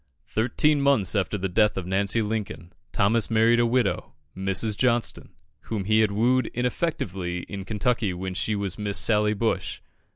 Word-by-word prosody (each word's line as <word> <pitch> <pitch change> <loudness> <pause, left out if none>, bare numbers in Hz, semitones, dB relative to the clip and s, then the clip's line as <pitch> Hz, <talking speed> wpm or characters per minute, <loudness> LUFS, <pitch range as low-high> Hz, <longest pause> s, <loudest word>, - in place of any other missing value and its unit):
Thirteen 140 +6 +1
months 135 -10 +3
after 105 0 -1
the 95 0 -2
death 105 +3 +2
of 95 - -3
Nancy 100 +4 +1
Lincoln, 105 -5 -5 0.2
Thomas 110 +1 +1
married 115 +1 +3
a 120 - +3
widow, 120 -3 0 0.2
Mrs. 95 +3 0
Johnston, 120 +1 0 0.4
whom 110 -3 -3
he 110 +2 +3
had 110 -1 +3
wooed 125 +5 +2
ineffectually 100 - -2
in 100 -2 -7
Kentucky 110 0 0
when 95 +1 -5
she 105 +3 -1
was 100 0 -3
Miss 100 -1 -1
Sally 105 -1 +2
Bush. 110 +2 -2
105 Hz, 160 wpm, -25 LUFS, 95-115 Hz, 0.4 s, months